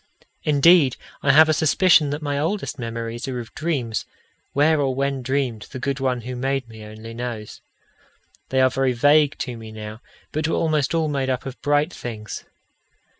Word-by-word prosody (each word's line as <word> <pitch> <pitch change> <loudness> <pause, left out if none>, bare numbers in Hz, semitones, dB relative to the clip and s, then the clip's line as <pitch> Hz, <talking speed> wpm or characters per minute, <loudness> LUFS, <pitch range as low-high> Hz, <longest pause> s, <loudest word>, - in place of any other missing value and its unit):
Indeed, 150 -1 +5 0.3
I 140 - +4
have 155 +3 +7
a 155 - +3
suspicion 155 0 +4
that 145 +2 -4
my 145 -1 -1
oldest 165 -1 -2
memories 115 +1 -4
are 130 -2 -3
of 115 - -9
dreams, 135 -9 -2 0.4
where 150 +2 +3
or 135 -2 0
when 140 0 -1
dreamed, 130 -4 -2
the 130 - -7
good 140 +2 -2
One 130 -2 0
who 125 +2 -6
made 135 0 -1
me 110 -1 -11
only 110 +2 -9
knows. 115 -3 -6 0.9
They 130 0 +2
are 130 0 +4
very 135 -1 +1
vague 145 +4 +4
to 125 -3 -4
me 110 -1 -9
now, 110 +1 -8 0.3
but 155 +1 -1
were 165 - 0
almost 155 -2 +1
all 160 -1 +1
made 140 -3 -1
up 130 -1 -2
of 135 -1 -7
bright 145 +3 +1
things. 110 -3 -7
135 Hz, 180 wpm, -23 LUFS, 120-145 Hz, 0.9 s, have